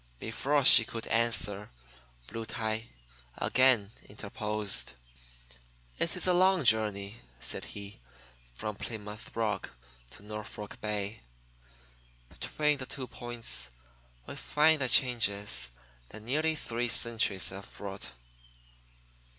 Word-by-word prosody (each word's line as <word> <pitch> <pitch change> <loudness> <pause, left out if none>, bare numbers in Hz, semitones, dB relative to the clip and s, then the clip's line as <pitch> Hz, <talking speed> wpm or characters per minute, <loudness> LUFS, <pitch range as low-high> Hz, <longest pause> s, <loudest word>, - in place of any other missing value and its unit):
Before 140 +5 0
she 125 - +12
could 115 0 -7
answer, 110 -3 +1 0.6
Black 115 - -7
Tie 110 0 -3 0.5
again 125 -6 +4 0.2
interposed. 105 - -1 1.1
"It 165 - +1
is 180 - +1
a 180 - +4
long 185 -1 +4
journey," 105 -3 +1 0.2
said - - -1
he, 100 0 -9 0.6
"from 105 - -5
Plymouth 105 -2 -7
rock 110 -2 -2 0.4
to 100 - -14
Norfolk 105 0 -8
Bay. 105 0 -3 1.1
Between 150 -2 -1
the 130 - -5
two 135 -2 -5
points 120 - -4 0.6
we - - -8
find 155 0 +3
the 130 - +2
changes 105 - +2 0.4
that 110 0 -10
nearly 155 +7 +1
three 120 -4 -2
centuries 110 -7 +1
have 95 +1 -9
brought. 100 -8 -6
110 Hz, 110 wpm, -30 LUFS, 105-125 Hz, 1.1 s, she